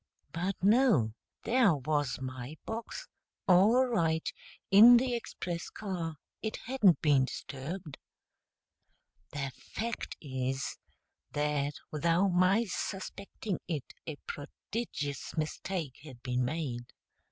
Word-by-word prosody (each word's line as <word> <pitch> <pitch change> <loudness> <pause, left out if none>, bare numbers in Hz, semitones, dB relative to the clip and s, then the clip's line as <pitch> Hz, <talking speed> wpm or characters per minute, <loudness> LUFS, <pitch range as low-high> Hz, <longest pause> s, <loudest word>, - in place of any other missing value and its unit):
But 180 +5 -1
no 210 - +5 0.3
there 230 -8 +4
was 145 0 0
my 130 +3 -6
box, 230 - -5 0.4
all 205 +8 +6
right, 165 -10 +1 0.4
in 230 +5 +10
the 250 +1 +1
express 180 -7 -4
car; 175 -6 -4 0.3
it 220 - -2
hadn't 215 - +4
been 140 -4 +5
disturbed. 145 +4 -6 1.3
[The 140 -2 -3
fact 230 +1 -5
is 130 -1 -3 0.5
that 145 -1 0 0.2
without 170 +5 +3
my 185 +5 +4
suspecting 195 0 -4
it 155 -6 -4
a 155 - -3
prodigious 145 - -5
mistake 155 -1 -3
had 130 -6 -12
been 125 -1 0
made. 125 -4 -3
165 Hz, 105 wpm, -31 LUFS, 140-205 Hz, 1.3 s, in